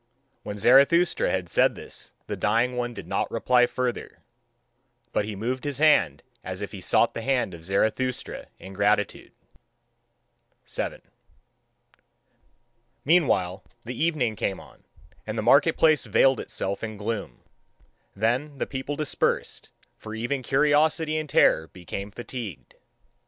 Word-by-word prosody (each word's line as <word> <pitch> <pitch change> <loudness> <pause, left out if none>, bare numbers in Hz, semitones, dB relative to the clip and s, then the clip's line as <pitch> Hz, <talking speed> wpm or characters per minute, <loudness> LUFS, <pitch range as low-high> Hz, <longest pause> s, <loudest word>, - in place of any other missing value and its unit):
When 105 -1 -6
Zarathustra 140 - +4
had 90 -2 -1
said - - +3
this - - -7
the - - -4
dying 115 +5 +1
one 120 -1 -3
did - - -8
not - - -1
reply 125 -1 +3
further; 125 -1 -4 0.9
but 105 - 0
he 105 -1 -5
moved 125 +6 -3
his 145 -3 -2
hand 100 - +3 0.2
as 95 0 -5
if 100 - -5
he 100 - -8
sought 115 - +3
the - - -5
hand 125 -6 0
of 85 -1 -10
Zarathustra 110 +7 -1
in 95 - -11
gratitude. 105 +1 0 1.3
7. - - -4 2.0
Meanwhile 115 - +2 0.2
the 125 - -5
evening 140 -10 0
came 95 -1 -2
on, - - -17 0.4
and 110 +1 -4
the 110 - -1
market 140 +7 +4
place 155 -2 +3
veiled 135 -2 +4
itself 100 +2 -4
in 110 -1 -5
gloom. 100 - -5 0.7
Then 125 +8 -1
the - - -1
people 135 +1 -4
dispersed, 150 0 -1 0.3
for 110 0 -8
even 125 +5 -2
curiosity 150 +4 +2
and 155 -1 -3
terror 80 - +4
become 95 +3 -7
fatigued. 115 - -8
120 Hz, 135 wpm, -25 LUFS, 100-140 Hz, 2.0 s, Zarathustra